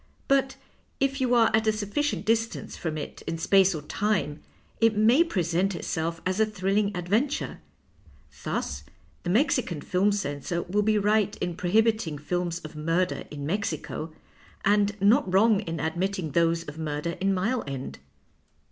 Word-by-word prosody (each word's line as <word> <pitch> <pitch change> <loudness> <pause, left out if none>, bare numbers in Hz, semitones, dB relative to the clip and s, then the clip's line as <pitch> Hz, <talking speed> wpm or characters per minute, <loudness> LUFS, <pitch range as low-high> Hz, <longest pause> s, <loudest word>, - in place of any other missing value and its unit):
But 270 -1 +2 0.4
if 275 0 0
you 250 -1 +3
are 230 -2 +5
at 220 0 +1
a - - +6
sufficient 215 +8 -2
distance 225 +1 -1
from 160 -2 -4
it 150 - -7
in 165 - -2
space 190 +2 +4
or 150 - -6
time, 175 -4 -1 0.4
it 225 -2 +3
may 235 +9 +5
present 185 - 0
itself 165 0 -3
as 185 +2 0
a 220 - +5
thrilling 200 0 0
adventure. 215 +12 -1 0.8
Thus - - -3 0.4
the 175 - -4
Mexican 235 - +1
film 185 +7 +1
censor 170 -3 -2
will 200 +4 0
be 215 +1 +2
right 210 0 +2
in 175 -1 -3
prohibiting 215 -3 +1
films 175 +3 -2
of 155 -1 -9
mmdcr 165 +4 -1
in 145 -1 -6
Mexico, 160 -3 -3 0.5
and 205 +1 +2
not 205 +4 +4
ANTong 200 +1 +3
in 165 -1 -3
admit 175 +6 -1
ting 175 -6 -4
those 165 +2 +2
of 150 +1 -9
murder 150 +1 -2
in 195 +1 +2
Mile 220 +7 0
End. 135 -1 -6
195 Hz, 155 wpm, -27 LUFS, 165-215 Hz, 0.8 s, a